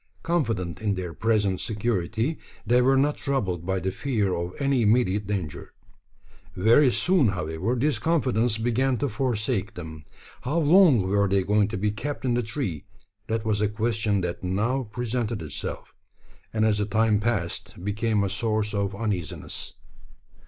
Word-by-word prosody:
Confident 115 Hz, -, -1 dB
in 105 Hz, -2 st, 0 dB
their 90 Hz, -2 st, -5 dB
present 105 Hz, -4 st, +1 dB
security, 110 Hz, -, -1 dB, 0.3 s
they 120 Hz, +3 st, +4 dB
were 135 Hz, +2 st, +4 dB
not 145 Hz, +2 st, +2 dB
troubled 95 Hz, -, -2 dB
by 95 Hz, 0 st, 0 dB
the 95 Hz, +2 st, -2 dB
fear 105 Hz, -6 st, -1 dB
of 85 Hz, +1 st, -4 dB
any 140 Hz, -3 st, +2 dB
immediate 105 Hz, -3 st, +2 dB
danger. 95 Hz, -7 st, -4 dB, 0.8 s
Very 120 Hz, +8 st, +5 dB
soon, 175 Hz, -1 st, +3 dB
however, 90 Hz, +4 st, -1 dB
this 130 Hz, -1 st, +1 dB
confidence 125 Hz, -8 st, +1 dB
began 120 Hz, +3 st, +1 dB
to 145 Hz, -, 0 dB
forsake 110 Hz, -4 st, -1 dB
them. 80 Hz, -3 st, -8 dB, 0.4 s
How 145 Hz, +7 st, -1 dB
long 155 Hz, -, +5 dB
were 100 Hz, +1 st, +2 dB
they 95 Hz, 0 st, +2 dB
going 105 Hz, +1 st, +2 dB
to 105 Hz, -, -4 dB
be 105 Hz, +2 st, 0 dB
kept 135 Hz, +7 st, -5 dB
in 125 Hz, -, +2 dB
the 120 Hz, -, +1 dB
tree? 105 Hz, -, -4 dB, 0.4 s
That 110 Hz, 0 st, -2 dB
was 105 Hz, -2 st, +1 dB
a 105 Hz, -, +2 dB
question 110 Hz, -2 st, 0 dB
that 90 Hz, 0 st, -4 dB
now 110 Hz, +8 st, 0 dB
presented 120 Hz, -2 st, -2 dB
itself; 75 Hz, -, -6 dB, 0.6 s
and 110 Hz, -1 st, +1 dB
as 105 Hz, -2 st, +2 dB
the 105 Hz, -, +1 dB
time 110 Hz, -1 st, +2 dB
passed, 100 Hz, -5 st, -2 dB
became 105 Hz, 0 st, 0 dB
a -, -, +1 dB
source 110 Hz, +1 st, -1 dB
of 100 Hz, 0 st, -1 dB
uneasiness. 100 Hz, -5 st, -4 dB
110 Hz, 160 wpm, -25 LUFS, 100-120 Hz, 0.8 s, Very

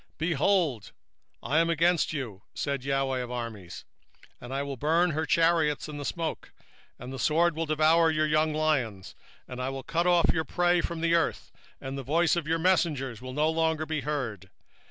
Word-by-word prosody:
2:13 -, -, -46 dB
Behold, 160 Hz, -, 0 dB, 0.5 s
I 155 Hz, -, +2 dB
am 165 Hz, 0 st, +2 dB
against 170 Hz, +1 st, +2 dB
thee, 130 Hz, -10 st, -4 dB, 0.2 s
saith 140 Hz, -2 st, -2 dB
the 135 Hz, -, -6 dB
LORD 135 Hz, -1 st, 0 dB
of 125 Hz, -, -6 dB
hosts, 115 Hz, -7 st, -6 dB, 0.6 s
and 120 Hz, -, -9 dB
I 135 Hz, +1 st, -1 dB
will 140 Hz, -1 st, -5 dB
burn 165 Hz, +6 st, +2 dB
her 155 Hz, +1 st, -2 dB
chariots 165 Hz, -3 st, +2 dB
in 150 Hz, -1 st, -7 dB
the 145 Hz, -, -5 dB
smoke, 165 Hz, 0 st, -4 dB, 0.5 s
and 125 Hz, +2 st, -8 dB
the 135 Hz, -, -6 dB
sword 165 Hz, +6 st, +2 dB
shall 165 Hz, 0 st, -2 dB
devour 160 Hz, +2 st, +4 dB
thy 155 Hz, 0 st, +1 dB
young 155 Hz, +1 st, +2 dB
lions: 135 Hz, -11 st, -1 dB, 0.3 s
and 125 Hz, 0 st, -6 dB
I 130 Hz, -, -2 dB
will 135 Hz, 0 st, -6 dB
cut 170 Hz, +2 st, 0 dB
off 175 Hz, -1 st, +4 dB
thy 160 Hz, -, 0 dB
prey 175 Hz, +3 st, +1 dB
from 170 Hz, -1 st, -4 dB
the 170 Hz, 0 st, +2 dB
earth, 170 Hz, -1 st, 0 dB, 0.3 s
and 135 Hz, +1 st, -6 dB
the -, -, -3 dB
voice 165 Hz, +7 st, +2 dB
of 170 Hz, -3 st, -2 dB
thy 165 Hz, +1 st, 0 dB
messengers 155 Hz, -, +1 dB
shall 130 Hz, +1 st, -8 dB
no 155 Hz, +3 st, +1 dB
more 160 Hz, -1 st, 0 dB
be 155 Hz, -2 st, -2 dB
heard. 120 Hz, -10 st, -4 dB
155 Hz, 195 wpm, -28 LUFS, 135-165 Hz, 0.6 s, devour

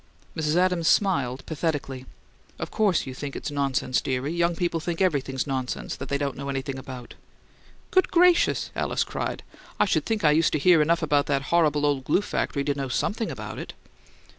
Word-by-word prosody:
Mrs. 155 Hz, 0 st, 0 dB
Adams 180 Hz, -2 st, +2 dB
smiled, 140 Hz, -11 st, +2 dB
pathetically. 145 Hz, -5 st, -3 dB, 0.5 s
"Of -, -, -5 dB
course 205 Hz, -6 st, +2 dB
you 130 Hz, -, -6 dB
think 140 Hz, +1 st, -6 dB
it's -, -, -4 dB
nonsense, 135 Hz, -3 st, 0 dB
dearie. 135 Hz, +4 st, -2 dB
Young 170 Hz, 0 st, +1 dB
people 170 Hz, -1 st, -1 dB
think 165 Hz, +1 st, -4 dB
everything's 140 Hz, -8 st, 0 dB
nonsense 130 Hz, -3 st, -3 dB
that -, -, -7 dB
they 140 Hz, -, +1 dB
don't 140 Hz, -2 st, -2 dB
know 140 Hz, 0 st, -6 dB
anything 135 Hz, 0 st, -3 dB
about." 130 Hz, -2 st, -9 dB, 0.8 s
"Good 375 Hz, -, +3 dB
gracious!" 355 Hz, 0 st, +3 dB
Alice -, -, 0 dB
cried. -, -, -4 dB, 0.4 s
"I -, -, +5 dB
should -, -, 0 dB
think 220 Hz, -4 st, -1 dB
I 150 Hz, -, +6 dB
used 160 Hz, +2 st, +3 dB
to -, -, +3 dB
hear 165 Hz, +2 st, +5 dB
enough 165 Hz, +2 st, +2 dB
about 145 Hz, -2 st, +2 dB
that 140 Hz, -1 st, 0 dB
horrible 150 Hz, -4 st, +3 dB
old 140 Hz, -2 st, +1 dB
glue 185 Hz, +7 st, +2 dB
factory 140 Hz, -7 st, -2 dB
to 145 Hz, -, 0 dB
know 140 Hz, -1 st, -3 dB
something 215 Hz, -, -1 dB
about -, -, -6 dB
it!" -, -, -7 dB
150 Hz, 190 wpm, -25 LUFS, 135-170 Hz, 0.8 s, I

